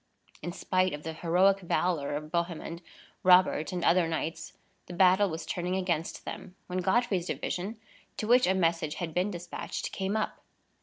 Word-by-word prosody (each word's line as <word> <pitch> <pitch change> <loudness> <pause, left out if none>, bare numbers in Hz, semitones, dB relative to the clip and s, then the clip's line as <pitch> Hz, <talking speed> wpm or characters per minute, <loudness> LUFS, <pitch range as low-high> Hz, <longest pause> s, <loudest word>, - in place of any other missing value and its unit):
In 175 - -4
spite 185 0 0
of 150 - -11
the 160 - -4
heroic 180 +4 +3
valor 170 -5 0
of 150 +1 -6
Bohemond, 170 -1 -3 0.4
Robert, 180 -4 +5
and 180 -2 -2
other 175 0 +4
knights, 165 0 -4 0.3
the 175 - -7
battle 190 +2 +5
was 160 -1 -5
turning 180 +3 -2
against 175 -4 -2
them, 180 - -7
when 185 0 -3
Godfrey's 190 -1 +1
division, 200 +6 -3 0.4
to - - -2
which 245 -1 +5
a 190 - +3
message 165 -4 +1
had 170 -3 -4
been 180 +4 +1
despatched, 175 -2 -5
came 195 +2 -1
up. 215 - -3
180 Hz, 165 wpm, -29 LUFS, 165-190 Hz, 0.4 s, Robert